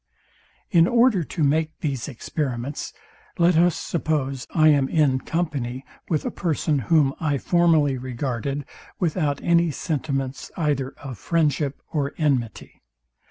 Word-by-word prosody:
In 170 0 +5
order 235 -6 +4
to 160 +1 -3
make 155 +2 +1
these 140 -7 -2
experiments, 135 0 -4 0.5
let 175 0 +4
us 170 +1 +4
suppose 140 -6 -2
I 155 -1 +4
am 140 -3 +3
in 145 -5 +2
company 135 -6 -3 0.2
with 155 -3 0
a - - -1
person, 155 -4 0
whom 140 +2 +3
I 145 -3 0
formerly 155 -4 +2
regarded 130 +2 -3 0.3
without 155 -5 0
any 170 0 +3
sentiments 135 -4 -3
either 145 -5 -1
of 135 -5 -8
friendship 150 -4 0
or 145 -3 -1
enmity. 130 -8 -1
145 Hz, 125 wpm, -23 LUFS, 135-165 Hz, 0.5 s, In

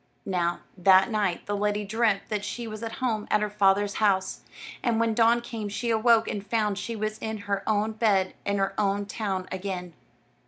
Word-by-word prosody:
Now, 175 -2 -1 0.2
that 190 +4 +5
night 205 -5 0
the 205 - -2
lady 205 0 0
dreamt 215 -1 +1
that 210 -1 -2
she 230 +3 -4
was 215 -1 -7
at 225 -1 -5
home 225 -5 -2
at 210 0 +2
her 210 - -2
father's 200 0 +2
house; 190 -3 +1 0.4
and 235 -3 +1
when 230 -1 +2
dawn 230 +1 +4
came 225 -3 -5
she 230 +4 -2
awoke 225 0 +4
and 200 - -3
found 210 -1 0
she 230 - -4
was 215 0 -3
in 220 0 -4
her 200 -1 -1
own 215 +1 +1
bed 205 -4 +1
in 200 0 0
her 195 0 0
own 200 0 +1
town 195 -3 -3
again. 185 -2 -4
210 Hz, 195 wpm, -27 LUFS, 195-220 Hz, 0.4 s, that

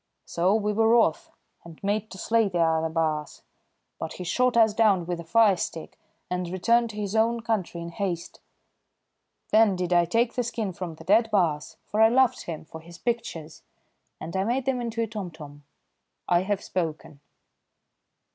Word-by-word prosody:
So 180 +4 +1
we 210 -1 0
were 220 +1 +3
wroth 225 -9 +3 0.3
and 165 -2 -12
made 210 +2 -1
to 190 - -10
slay 225 +3 +2
the 180 - -3
other 160 -1 +2
baas, 155 -2 -2 0.6
but 160 - -5
he 180 - -7
shot 250 +7 +1
us 220 -2 +5
down 205 -5 +3
with 175 0 -3
a - - -6
fire 205 +4 +4
stick 165 -1 -5 0.3
and 180 -1 -3
returned 230 +6 +2
to 215 - -9
his 210 0 -3
own 230 +1 +2
country 210 -7 -2
in 170 - -6
haste. 175 -1 -4 1.1
Then 215 -3 +5
did 180 -1 -1
I 175 0 +4
take 230 +7 +1
the 250 - 0
skin 225 -5 -3
from 175 -2 -6
the 160 - -13
dead 220 +6 +3
baas, 165 -7 0
for 215 - -1
I 220 - +7
loved 260 +1 +3
him 160 -2 -6
for 160 +1 -10
his 170 +1 -13
pictures, 230 -10 -4 0.6
and 170 - -7
I 190 - +1
made 245 +5 -1
them 260 -2 0
into 230 -1 -2
a - - -2
tomtom. 160 -9 -8 0.6
I 175 - +4
have 200 +1 -2
spoken." 160 -5 -4
190 Hz, 180 wpm, -26 LUFS, 170-225 Hz, 1.1 s, I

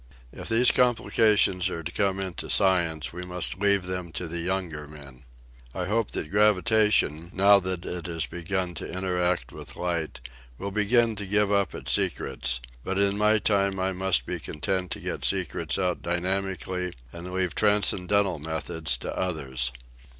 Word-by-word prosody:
If - - -8
these 115 +2 +5
complications 110 -6 +3
are 85 -2 -5
to - - -5
come 95 -2 0
into 95 -4 -4
science 85 -8 +2
we 90 - -6
must 90 0 -1
leave 100 -2 +2
them 90 -2 -4
to 85 +1 -4
the 85 +1 -4
younger 85 -4 -3
men. 70 -4 -13 0.5
I 90 - -2
hope 110 +3 0
that 75 - -4
gravitation, 105 -5 +3
now 100 +2 +6
that 90 -2 -2
it 90 -1 -5
has 80 -1 -2
begun 90 +1 -3
to - - -5
inter 90 -1 -1
act 90 0 0
with - - -9
light, 85 -6 -3 0.4
will 100 +1 -5
begin 110 +3 +3
to 100 - -4
give 105 +1 +2
up 100 -1 +1
its - - -4
secrets, - - 0 0.2
but 95 - -2
in 100 0 +3
my 105 +1 +4
time 100 -2 +1
I 95 +1 0
must 95 -9 +1
be - - -4
content 90 +4 -3
to - - -4
get - - -5
secrets 80 -2 0
out 90 -2 -1
dynami 95 +2 0
cally 90 -1 -4 0.2
and 85 +2 -7
leave 90 -3 -1
transcendental 100 -3 +2
methods 80 +1 -2
to - - -5
others." 65 -8 -2
90 Hz, 170 wpm, -26 LUFS, 85-100 Hz, 0.5 s, now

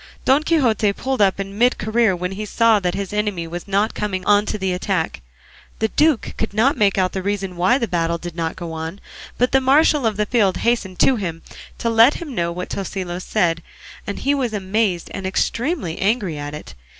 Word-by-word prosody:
Don 270 +3 +4
Quixote 240 -10 +2
pulled 260 +1 -2
up 195 -1 +3
in 195 +1 -5
mid 245 +1 +4
career 220 -2 +2
when 180 +1 -3
he 200 +3 -5
saw 225 +1 +3
that 180 -2 -1
his 200 0 -4
enemy 210 -5 -1
was 175 +3 -7
not 200 +2 +1
coming 190 -3 -3
on 205 0 +4
to - - -2
the 190 -2 -1
attack. 180 -2 -2 0.6
The 220 - 0
duke 300 -2 +2
could 220 -2 -2
not 250 +6 +3
make 200 -2 +2
out 185 -1 +2
the 190 - -3
reason 195 -1 -3
why 185 +9 +3
the 235 - -1
battle 170 -2 0
did 175 -1 -8
not 165 -1 -2
go 170 -2 -6
on; 160 +4 -5 0.4
but 250 +1 +2
the 270 - +4
marshal 280 0 +4
of 215 -2 -2
the 210 - +1
field 205 -5 +2
hastened 225 -6 0
to 265 - +4
him 170 -5 -5 0.3
to - - -3
let 230 +4 +5
him 310 -5 -6
know 170 -5 -1
what 180 +1 -5
Tosilos 185 -2 -4
said, 170 -6 +1 0.5
and 200 - -3
he 280 - +1
was 255 -5 -1
amazed 195 -2 -1
and 195 -1 -4
extremely 235 - -1
angry 200 -4 0
at 145 0 -5
it. 150 - -10
200 Hz, 210 wpm, -20 LUFS, 180-230 Hz, 0.6 s, let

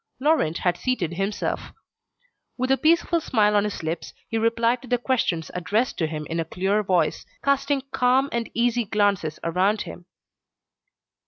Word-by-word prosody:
Laurent 275 - +2
had 175 -1 0
seated 215 -11 -1
himself. 195 +4 -3 0.8
With 255 +1 0
a 270 - +4
peaceful 335 +2 +3
smile 210 -7 +2
on 205 0 +3
his 210 -5 -4
lips, 160 +1 -4
he 225 - -1
replied 230 +2 +2
to 260 - -12
the 245 - +2
questions 225 - -1
addressed 210 +8 -1
to 160 - +1
him 155 -1 -5
in 165 +2 -3
a - - +1
clear 190 +5 0
voice, 180 -6 +1 0.2
casting 280 0 +1
calm 255 +2 +3
and 235 -1 -2
easy 240 0 +1
glances 200 -6 +1
around 185 +5 +1
him. 175 0 -10
210 Hz, 160 wpm, -24 LUFS, 175-250 Hz, 0.8 s, a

